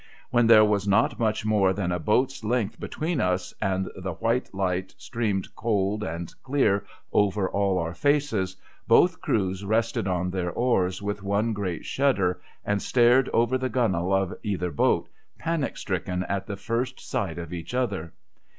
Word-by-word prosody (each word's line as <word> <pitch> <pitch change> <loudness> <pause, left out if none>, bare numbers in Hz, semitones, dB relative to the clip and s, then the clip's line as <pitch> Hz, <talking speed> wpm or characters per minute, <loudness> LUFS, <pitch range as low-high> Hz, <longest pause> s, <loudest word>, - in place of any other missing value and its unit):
When 120 -1 +4
there 110 -2 +8
was 100 -1 0
not 100 +4 +2
much 110 -2 0
more 100 -3 +3
than 95 -2 -2
a 90 - -1
boat's 125 - +1
length 115 -1 -1
between 155 -3 -2
us, 90 0 -1
and 95 0 0
the 95 -1 -4
white 115 +8 -1
light 95 -1 -2
streamed 105 -6 -2
cold 105 -2 0
and 85 -3 -5
clear 130 -8 +1 0.3
over 100 -1 +2
all 100 -1 +1
our 85 -1 -2
faces, 115 -7 +1 0.3
both 180 +10 +4
crews 95 -2 0
rested 110 -1 0
on 90 0 -1
their 90 -2 -1
oars 95 -4 0
with 105 0 -3
one 100 +3 0
great 95 -5 -3
shudder, 100 -10 +1 0.2
and 100 -1 0
stared 125 +1 +4
over 120 +3 +2
the 130 0 -1
gunwale 95 -7 +1
of 95 -1 0
either 90 -4 -2
boat, 70 - +2 0.3
panic 165 -4 -2
stricken 90 -1 -2
at 100 0 -3
the 100 -2 -4
first 120 +5 -2
sight 85 -6 -3
of 85 0 -6
each 85 +7 -6
other. 100 -10 -1
100 Hz, 165 wpm, -26 LUFS, 95-115 Hz, 0.3 s, there